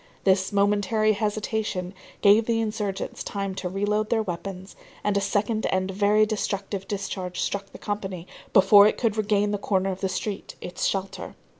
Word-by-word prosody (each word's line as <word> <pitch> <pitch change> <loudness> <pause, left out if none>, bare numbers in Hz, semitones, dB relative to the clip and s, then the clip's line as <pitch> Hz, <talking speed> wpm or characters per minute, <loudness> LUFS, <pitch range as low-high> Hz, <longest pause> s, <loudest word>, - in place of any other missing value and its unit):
This 190 0 +3
momentary 205 +2 +2
hesitation 210 -3 -2 0.3
gave 210 +2 +5
the 230 -1 +2
insurgents 210 -3 -3
time 195 -1 -3
to 185 -1 -4
re 195 +3 -1
load 210 +1 0
their 225 -2 +2
weapons, 190 0 -6 0.3
and 205 -1 +1
a 200 - +2
second 205 +2 0
and 185 0 0
very 205 +2 +3
destructive 200 -2 -3
discharge 190 -2 -4
struck 200 0 -2
the - - -10
company 195 -4 -4 0.3
before 200 +2 +7
it - - 0
could 225 -4 0
regain 210 -1 +1
the 205 - -1
corner 195 -1 0
of 185 - -6
the 190 - 0
street, 195 +2 -4
its 180 - -4
shelter. 195 0 -3
200 Hz, 170 wpm, -25 LUFS, 190-210 Hz, 0.3 s, before